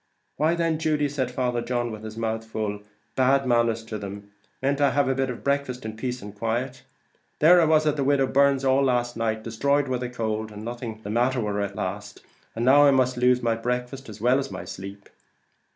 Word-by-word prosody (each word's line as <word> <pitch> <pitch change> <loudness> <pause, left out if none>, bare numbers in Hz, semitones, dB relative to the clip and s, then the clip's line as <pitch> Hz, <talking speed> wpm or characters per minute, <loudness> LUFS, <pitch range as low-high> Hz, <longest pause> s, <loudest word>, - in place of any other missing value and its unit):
"Why, 160 +3 +2
then, 165 -2 0
Judy," 150 -2 +1
said 135 -3 -2
Father 125 -1 -1
John, 120 0 -2
with 110 0 -8
his 110 0 -8
mouth 115 0 -2
full, 110 -2 -4 0.3
"bad 135 +1 +3
manners 115 -2 +2
to 110 -1 -5
them; 100 0 -8 0.3
mayn't 140 +2 0
I 140 0 +3
eat 140 - +3
a - - +2
bit 135 0 -1
of 125 - -6
breakfast 140 -3 -1
in 110 0 -5
peace 125 +1 -4
and 105 -1 -8
quiet? 120 +5 -3 0.6
There 175 +3 +6
was 155 0 +4
I 150 - +4
at 150 - -7
the 140 - 0
widow 140 0 +3
Byrne's 140 0 +2
all 135 +1 +3
night, 120 -3 0
destroyed 140 +6 0
with 130 -1 -1
the 125 0 -4
cold, 110 -2 -3
and 105 +1 -9
nothing 115 -2 -6
the 100 - -5
matter 125 +3 +1
with 105 -3 -2
her 100 - -1
at 100 0 -4
last, 105 +3 -5 0.3
and 115 +1 -1
now 145 +3 +7
I - - +7
must 130 -2 +2
lose 125 0 +2
my 115 -1 +2
breakfast, 125 +3 -4
as 105 0 -10
well 125 +4 +3
as 135 0 -4
my - - -7
sleep." 100 +2 -9
125 Hz, 220 wpm, -25 LUFS, 110-135 Hz, 0.6 s, now